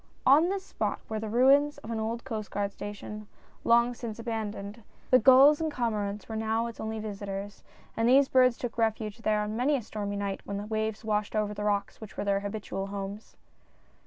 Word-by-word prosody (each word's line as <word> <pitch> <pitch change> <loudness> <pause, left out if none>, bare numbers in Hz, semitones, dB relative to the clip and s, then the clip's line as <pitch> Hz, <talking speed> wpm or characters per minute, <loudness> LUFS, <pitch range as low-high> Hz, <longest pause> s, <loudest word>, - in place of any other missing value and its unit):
On 300 +7 +6
this 390 0 -2
spot - - -2
were 220 -1 -3
the 220 0 -4
ruins 275 +5 +4
of 225 - -8
an 225 - -2
old 230 +2 -3
Coast 220 -5 -5
Guard 200 0 -2
station 205 +1 -7 0.2
— - - -30
long 235 +1 +4
since 230 -3 -6
abandoned 220 -2 -5 0.2
— - - -30
the 255 - +8
gulls 270 +6 +7
and 320 -1 0
cormorants 210 -5 -2
were 220 - -5
now 220 +1 0
its 235 -1 -7
only 220 0 -3
visitors, 200 -1 -6 0.3
and 225 +1 +2
these 270 +2 +6
birds 255 -2 +4
took 235 -1 -5
refuge 220 -1 -1
there 215 -2 +1
on 210 +1 -3
many 265 +5 +2
a 265 - -1
stormy 205 -1 -4
night 200 -1 -3
when 200 - -4
the 205 - -4
waves 220 +1 -2
washed 210 0 -1
over 210 -1 0
the 210 0 -5
rocks 205 0 -1
which 215 - -10
were - - -2
their 200 -1 +2
habitual 200 -1 -4
homes. 200 +1 -7
220 Hz, 210 wpm, -29 LUFS, 205-235 Hz, 0.3 s, the